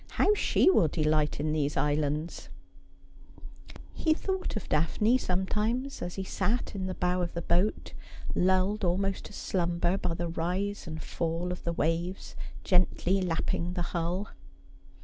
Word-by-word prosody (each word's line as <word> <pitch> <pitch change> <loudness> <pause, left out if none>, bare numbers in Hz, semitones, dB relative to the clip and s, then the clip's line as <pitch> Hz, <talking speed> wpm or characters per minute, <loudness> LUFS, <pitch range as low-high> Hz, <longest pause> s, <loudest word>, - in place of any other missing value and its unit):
How 420 - +4
she 415 - +3
will 170 - +4
delight 155 -1 +1
in 150 +1 0
these 145 -2 0
islands! 150 +2 -1 0.7
' - - -22 0.7
He 315 -1 +2
thought 380 -3 -2
of 215 - -4
Daphne 210 +10 +2
sometimes, 215 +8 -1
as 175 0 -4
he 195 - -3
sat 230 +5 -1
in 190 -2 -3
the 185 - -3
bow 180 0 +1
of 175 -1 -3
the 170 - -2
boat, 180 +5 +1 0.4
lulled 190 +3 +2
almost 190 +2 0
to - - -10
slumber 175 0 0
by 170 -2 -1
the 170 +1 -2
rise 180 +5 -2
and 160 -1 -5
fall 170 +1 -2
of 180 - -6
the 170 - +1
waves 170 +4 -1 0.3
gently 185 +1 +2
lapping 175 0 -1
the 180 - -2
hull. 175 +4 -1
180 Hz, 150 wpm, -29 LUFS, 165-195 Hz, 0.7 s, How